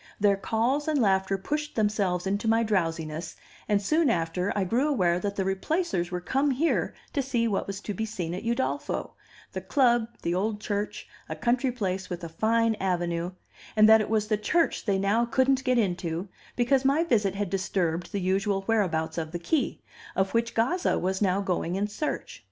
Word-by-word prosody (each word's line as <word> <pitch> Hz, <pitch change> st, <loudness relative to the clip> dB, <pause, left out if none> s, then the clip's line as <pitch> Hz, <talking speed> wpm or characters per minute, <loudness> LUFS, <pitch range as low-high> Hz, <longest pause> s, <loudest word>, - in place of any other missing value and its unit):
Their 205 Hz, -1 st, +4 dB
calls 235 Hz, +8 st, 0 dB
and 305 Hz, -2 st, +2 dB
laughter 195 Hz, -3 st, +2 dB
pushed 295 Hz, +9 st, -3 dB
themselves 205 Hz, -5 st, 0 dB
into 200 Hz, +3 st, -1 dB
my 225 Hz, +1 st, +3 dB
drowsiness, 165 Hz, -6 st, -2 dB, 0.3 s
and 205 Hz, -1 st, +3 dB
soon 305 Hz, +9 st, +2 dB
after 175 Hz, 0 st, 0 dB
I 200 Hz, -, +1 dB
grew 240 Hz, +10 st, +1 dB
aware 180 Hz, -12 st, +2 dB
that 200 Hz, +2 st, -3 dB
the 195 Hz, -, -1 dB
Replacers 195 Hz, -, -1 dB
were 180 Hz, 0 st, -3 dB
come 270 Hz, +10 st, 0 dB
here 285 Hz, +5 st, 0 dB, 0.2 s
to 285 Hz, -, +1 dB
see 245 Hz, -3 st, 0 dB
what 200 Hz, -3 st, -1 dB
was 200 Hz, 0 st, -4 dB
to 210 Hz, -, -4 dB
be 220 Hz, +3 st, -3 dB
seen 175 Hz, -6 st, -4 dB
at 185 Hz, -, -4 dB
Udolpho 235 Hz, +4 st, -2 dB, 0.4 s
the -, -, -4 dB
club, 240 Hz, -5 st, +3 dB, 0.2 s
the 170 Hz, -, 0 dB
old 205 Hz, +3 st, -1 dB
church, 205 Hz, 0 st, -3 dB, 0.2 s
a -, -, -3 dB
country 245 Hz, +2 st, +1 dB
place 190 Hz, -6 st, -3 dB
with 175 Hz, -1 st, -5 dB
a 165 Hz, -, -5 dB
fine 225 Hz, +6 st, +2 dB
avenue 175 Hz, -1 st, -1 dB, 0.4 s
and 215 Hz, 0 st, +7 dB
that 220 Hz, 0 st, +7 dB
it 210 Hz, -, -3 dB
was 215 Hz, -1 st, +1 dB
the 215 Hz, -1 st, +1 dB
church 330 Hz, +10 st, +1 dB
they 200 Hz, -3 st, +2 dB
now 200 Hz, +4 st, +2 dB
couldn't 265 Hz, +2 st, +2 dB
get 255 Hz, -1 st, +2 dB
into, 180 Hz, -3 st, -1 dB, 0.3 s
because 260 Hz, +2 st, +2 dB
my 280 Hz, +4 st, +3 dB
visit 210 Hz, -, +1 dB
had 200 Hz, -2 st, -2 dB
disturbed 180 Hz, -3 st, -1 dB
the 200 Hz, -, -2 dB
usual 195 Hz, +1 st, 0 dB
whereabouts 170 Hz, -7 st, 0 dB
of 160 Hz, -1 st, -4 dB
the 175 Hz, -, -3 dB
key, 270 Hz, -, -1 dB, 0.3 s
of 190 Hz, 0 st, 0 dB
which 230 Hz, 0 st, 0 dB
Gazza 340 Hz, +11 st, +1 dB
was 190 Hz, +2 st, -1 dB
now 195 Hz, 0 st, +2 dB
going 180 Hz, -2 st, -1 dB
in 200 Hz, +2 st, 0 dB
search. 210 Hz, +9 st, -4 dB
205 Hz, 190 wpm, -27 LUFS, 185-235 Hz, 0.4 s, and